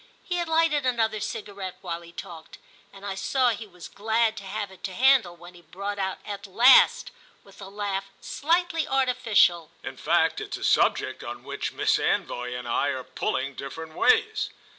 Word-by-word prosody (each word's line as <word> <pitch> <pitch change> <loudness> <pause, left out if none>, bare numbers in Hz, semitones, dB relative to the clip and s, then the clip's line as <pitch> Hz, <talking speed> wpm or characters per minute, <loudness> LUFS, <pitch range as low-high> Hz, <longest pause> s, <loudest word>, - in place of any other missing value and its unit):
He 355 - -3
had 345 -1 -1
lighted 320 -3 +2
another 225 -4 0
cigarette 205 -3 -5
while 170 -2 -5
he 170 0 -14
talked, 170 -3 -10 0.3
and 195 0 -12
I 200 - -3
saw 250 +6 +1
he 225 -1 -4
was 180 -3 -11
glad 220 +1 0
to 200 - -7
have 205 0 -4
it 190 - -17
to 190 - -5
handle 255 -8 +4
when 175 +1 -13
he 175 - -15
brought 200 +3 -6
out 190 -1 -2
at 200 0 -6
last, 245 - +6 0.3
with 195 0 -17
a 195 - -8
laugh 200 -1 -3
slightly 330 0 0
artificial: 225 - +2
"In 135 0 -7
fact 165 +2 +1
it's - - -5
a - - -9
subject - - +2
on - - -7
which - - -4
Miss - - +2
Anvoy 125 0 -1
and 125 -1 -7
I 120 +4 +1
are 130 -2 -2
pulling 130 +1 -3
different 160 +4 -8
ways." 440 - +2
200 Hz, 185 wpm, -26 LUFS, 175-240 Hz, 0.3 s, last